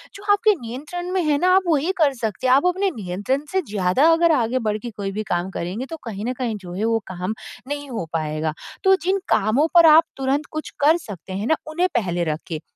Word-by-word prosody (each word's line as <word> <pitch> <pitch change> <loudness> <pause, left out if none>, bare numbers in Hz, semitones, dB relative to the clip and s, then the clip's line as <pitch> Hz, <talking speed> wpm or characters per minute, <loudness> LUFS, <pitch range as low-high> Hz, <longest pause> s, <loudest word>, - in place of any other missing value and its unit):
जो 400 - -11
आपके 425 0 +3
नियंत्रण 300 +10 -6
में 375 - +2
है 295 -2 +2
ना 365 +3 +3
आप 385 - +4
वही 320 +2 +2
कर 295 -4 +3
सकते 230 0 -3
हैं, 255 - +5
आप 275 +5 +4
अपने 380 +2 +1
नियंत्रण 210 +9 -2
से 380 - +2
ज़्यादा 200 - +3
अगर 335 0 +4
आगे 250 -1 +1
बढ़ 210 - 0
के 240 +1 -7
कोई 200 -2 -4
भी 215 +2 -3
काम 175 +2 -1
करेंगे, 190 +9 -4
तो 325 +3 -7
कहीं 210 -3 -5
न 250 - -1
कहीं 235 -4 -1
जो 180 -3 -10
है 205 +4 -2
वो 225 0 +2
काम 185 +4 -3 0.3
नहीं 285 0 -5
हो 220 -8 -3
पाएगा। 155 -1 -2 0.3
तो 385 0 +7
जिन 385 +2 +1
कामों 220 +10 +3
पर 340 -1 +8
आप 315 +1 +8
तुरंत 270 +3 0
कुछ 310 0 -5
कर 310 +4 +5
सकते 195 - -9
हैं 205 +5 -3
ना, 315 - +4
उन्हें 345 +4 +1
पहले 175 -6 0
रखे, 155 0 -4
255 Hz, 230 wpm, -22 LUFS, 195-315 Hz, 0.3 s, पर